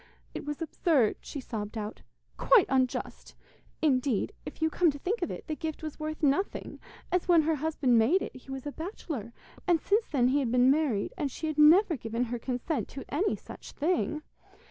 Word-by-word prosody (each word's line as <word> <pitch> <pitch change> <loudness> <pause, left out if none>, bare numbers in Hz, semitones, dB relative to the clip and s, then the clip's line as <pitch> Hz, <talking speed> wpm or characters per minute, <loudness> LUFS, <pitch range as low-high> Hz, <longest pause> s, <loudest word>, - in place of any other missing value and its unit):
'It - - -5
was 295 +2 -3
absurd,' 305 - +2
she 285 - -7
sobbed 220 -3 -5
out, 210 0 -5 0.3
'quite 460 -8 +5
unjust. 260 -1 -1 0.5
Indeed, 260 - +1
if - - -8
you 320 0 +1
came 350 +1 +3
to 285 - -3
think 390 +10 -2
of 350 - -1
it, - - -6
the 310 - -3
gift 315 0 -5
was 310 -1 -6
worth 310 0 -5
nothing, 290 +8 0 0.3
as 360 -1 +1
when 340 -3 +6
her 320 +1 +2
husband 290 -5 +2
made 305 +13 +3
it - - -7
he 255 +1 -14
was 270 0 -6
a 290 - -3
bachelor, 315 - -6 0.4
and 345 -2 +4
since 420 +8 +1
then 250 -4 +2
he 280 +3 +2
had 250 -5 -1
been 250 +1 +5
married, 275 -9 0
and 285 - 0
she 320 - -6
had 310 -1 -2
never 330 +4 +7
given 230 +1 -2
her 240 0 -3
consent 250 - -2
to 270 - -8
any 375 +8 +1
such - - -11
thing. 310 -1 0
295 Hz, 200 wpm, -29 LUFS, 250-325 Hz, 0.5 s, never